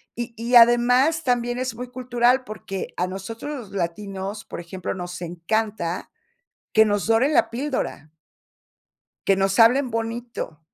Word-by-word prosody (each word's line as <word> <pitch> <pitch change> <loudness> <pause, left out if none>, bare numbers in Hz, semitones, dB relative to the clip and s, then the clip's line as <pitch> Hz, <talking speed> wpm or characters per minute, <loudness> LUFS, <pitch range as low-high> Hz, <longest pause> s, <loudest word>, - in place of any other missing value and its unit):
Y 235 0 -5
y 235 +2 0
además 245 +7 +5
también 245 -1 0
es 255 -2 -3
muy 250 +1 -7
cultural, 250 0 +1
porque 195 -3 -6
a 180 - +1
nosotros 210 +9 -6 0.2
los - - -18
latinos, 195 +3 -4
por - - -7
ejemplo, 175 +1 -5
nos 180 -1 -6
encanta 175 +1 -2 0.6
que 220 - +6
nos 205 -2 0
doren 245 +7 +3
la - - +3
píldora. 255 - -3 1.2
Que 195 - +5
nos 195 0 +1
hablen 250 +4 +5
bonito, 230 -6 -4
225 Hz, 140 wpm, -23 LUFS, 195-245 Hz, 1.2 s, que